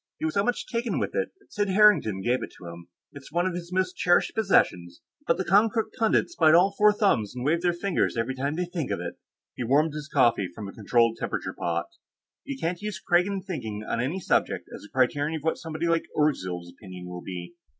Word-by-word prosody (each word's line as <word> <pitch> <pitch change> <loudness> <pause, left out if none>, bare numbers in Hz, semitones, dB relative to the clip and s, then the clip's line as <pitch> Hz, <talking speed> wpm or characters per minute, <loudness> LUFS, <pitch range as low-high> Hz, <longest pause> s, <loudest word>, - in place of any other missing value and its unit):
He - - -3
was 160 - -1
so 200 - +2
much 245 +2 -1
taken 235 0 -2
with - - -2
it 485 - -1
that 400 - -23
Sid 205 -1 0
Harrington 190 - +4
gave 125 +3 +1
it - - -6
to - - -12
him. 85 0 -9 0.3
It's 140 -1 -12
one 175 +3 +1
of 185 - -1
his 175 0 -6
most 185 0 0
cherished 175 0 +2
possessions, 90 - +1 0.3
but 170 - +3
the 190 - -2
Konkrook 220 +3 +2
pundits 225 +10 +2
bite 155 0 +5
all 190 +3 +5
four 210 +1 +6
thumbs 195 - +1
and 125 0 -4
wave 165 +3 +2
their 175 0 +2
fingers 175 -6 -1
every 115 +3 -1
time 140 +3 -2
they 180 +2 -1
think 170 -5 -4
of - - -2
it." 85 0 -6 0.3
He 125 - -4
warmed 145 +6 +2
his 150 0 -7
coffee 120 -8 +3
from 105 -2 -6
a - - -7
controlled 115 +1 +2
temperature - - -3
pot. 85 0 -2 0.6
"You 140 - -5
can't 170 +3 -2
use 210 -4 -4
Kragan 180 +3 +1
thinking 110 - -5
on 115 - -1
any 145 +10 -2
subject - - 0
as - - -11
a 105 - -13
criterion 145 +4 +1
of 155 - -6
what 160 - 0
somebody 160 0 -4
like 165 -1 +1
Orgzild's 90 - 0
opinions 90 -3 -10
will 90 0 -7
be." 90 +2 -7
155 Hz, 225 wpm, -26 LUFS, 115-185 Hz, 0.6 s, four